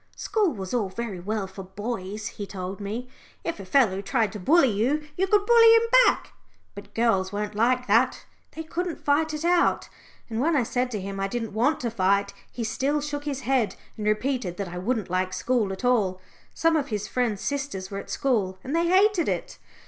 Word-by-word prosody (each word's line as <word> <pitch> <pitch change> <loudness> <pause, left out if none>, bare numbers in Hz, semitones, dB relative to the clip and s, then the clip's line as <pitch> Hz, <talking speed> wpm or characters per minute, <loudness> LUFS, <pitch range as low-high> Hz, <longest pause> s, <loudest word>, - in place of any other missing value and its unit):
School 420 -6 +1
was 190 -2 -6
all 220 -6 0
very 205 -2 -5
well 205 +2 -2
for 190 +1 -9
boys, 205 +1 -5
he 205 -1 -6
told 190 +1 -6
me. 220 +5 -4 0.4
If 335 - -3
a 195 - -7
fellow 195 -3 +3
tried 215 +1 0
to 210 - -7
bully 275 - +4
you, 270 +9 0
you 380 +2 +1
could 410 0 +3
bully 460 -1 +7
him 455 - +6 0.3
back. - - 0 0.4
But 200 0 -12
girls 195 -5 +2
weren't 210 +1 -3
like 250 +4 +2
that 230 +4 +2 0.3
they 320 - -6
couldn't 340 +1 -4
fight 305 +2 +2
it 305 +1 -4
out. 350 0 +2 0.4
And 225 -1 -4
when 320 +3 +2
I 270 - +3
said 250 +2 -1
to 215 -4 -3
him 195 +1 -5
I 195 - 0
didn't 225 0 -4
want 250 +9 +2
to 235 -2 -2
fight, 200 -1 +1 0.2
he 240 - -4
still 265 +7 0
shook 290 0 -4
his 275 -2 -3
head, 250 -3 +1 0.2
and 210 -2 -4
repeated 215 -4 -1
that 200 -3 -4
I 180 +1 -6
wouldn't 215 -1 -2
like 185 0 0
school 210 +2 0
at 190 +5 -5
all 205 -7 +2 0.4
some 330 0 +2
of 290 -3 0
his 210 -2 -3
friends' 235 -5 -1
sisters 270 -10 -3
were 195 - -3
at - - -10
school 210 -9 0
and 270 +5 -3
they 335 +1 +2
hated 380 0 +3
it. - - -4
230 Hz, 210 wpm, -25 LUFS, 200-285 Hz, 0.4 s, bully